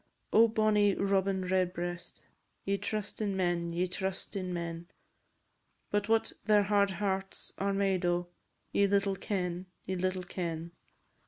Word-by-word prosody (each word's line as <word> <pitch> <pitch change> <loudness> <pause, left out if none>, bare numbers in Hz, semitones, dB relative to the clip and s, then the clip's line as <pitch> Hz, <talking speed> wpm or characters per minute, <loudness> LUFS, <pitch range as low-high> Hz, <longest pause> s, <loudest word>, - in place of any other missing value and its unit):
Oh! 230 +1 +8
bonny 215 -2 +3
Robin 195 -1 +1
Redbreast, 175 -1 -1 0.4
Ye 200 - +2
trust 210 +1 -3
in 200 -2 0
men, 175 -2 0
ye 175 +2 +1
trust 190 +2 -4
in 185 -2 -2
men, 170 -1 -4 1.0
But 205 +1 0
what 225 0 +2
their 210 -1 +5
hard 200 0 +3
hearts 195 -1 -2
are 200 +1 +1
made 195 -2 +1
o', 175 0 +1 0.5
Ye 200 - +4
little 200 0 +2
ken, 180 -2 -2 0.2
ye 190 - -2
little 185 0 -1
ken. 170 -2 -4
190 Hz, 140 wpm, -31 LUFS, 180-200 Hz, 1.0 s, Oh